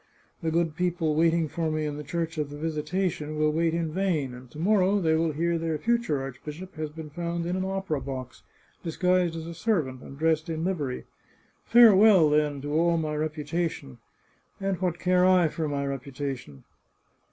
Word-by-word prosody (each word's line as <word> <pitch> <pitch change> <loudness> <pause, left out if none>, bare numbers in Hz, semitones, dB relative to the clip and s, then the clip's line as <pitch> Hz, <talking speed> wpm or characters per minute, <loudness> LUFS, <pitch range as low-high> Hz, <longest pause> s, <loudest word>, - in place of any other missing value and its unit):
The 165 - 0
good 165 -1 0
people 175 -2 0
waiting 165 +1 +3
for 160 +1 -2
me 155 0 -1
in 150 -1 -3
the 150 - -6
Church 165 +1 -3
of 150 -1 -1
the 145 - -8
Visitation 155 0 -2
will 155 0 +2
wait 165 +1 +1
in 165 -2 -1
vain, 160 -8 0
and 125 0 -11
to 135 - -13
morrow 195 +3 +3
they 160 -4 +2
will 160 0 +1
hear 170 +2 0
their 165 -1 -1
future 235 - 0
archbishop 150 +7 -8
has 155 -1 -4
been 155 0 -9
found 170 +1 -3
in 175 +1 -1
an 185 - -1
opera 190 -6 -2
box, 130 -2 -6 0.4
disguised 180 0 +1
as 160 -1 -5
a 170 - -6
servant, 160 - -1
and 135 - -11
dressed 160 +1 +1
in 160 0 -2
livery. 155 -9 -2 0.6
Farewell, 210 -8 +7
then, 150 -2 +1
to 145 0 -3
all 170 +2 +3
my 155 -2 -2
reputation! 155 - -3 0.6
And 195 -2 -2
what 180 -2 0
care 180 0 +2
I 180 -3 +5
for 160 0 -3
my 140 -1 -2
reputation 135 - -5
160 Hz, 185 wpm, -27 LUFS, 150-175 Hz, 0.6 s, Farewell